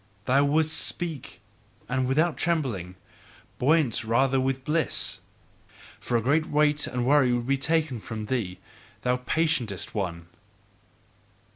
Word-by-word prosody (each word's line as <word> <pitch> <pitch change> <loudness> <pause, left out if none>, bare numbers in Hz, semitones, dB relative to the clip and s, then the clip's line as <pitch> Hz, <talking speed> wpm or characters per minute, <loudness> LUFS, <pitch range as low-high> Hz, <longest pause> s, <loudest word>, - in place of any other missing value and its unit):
Thou 135 +3 +4
wouldst 155 +2 +2
speak, 165 -6 -4 0.5
and 130 0 0
without 155 +5 +2
trembling, 125 - -1 0.6
buoyant 145 -4 +2
rather 130 +4 +2
with 130 0 -1
bliss, 155 +2 -1 0.8
for 120 - 0
a - - 0
great 150 +5 +2
weight 150 0 +2
and 125 -1 -2
worry 135 -2 +4
would 120 -1 0
be 135 +2 +2
taken 150 -2 0
from 110 0 -6
thee, 105 -7 -2 0.5
thou 125 0 +2
patientest 125 - -1
one! 90 -5 -3
130 Hz, 125 wpm, -26 LUFS, 120-150 Hz, 0.8 s, Thou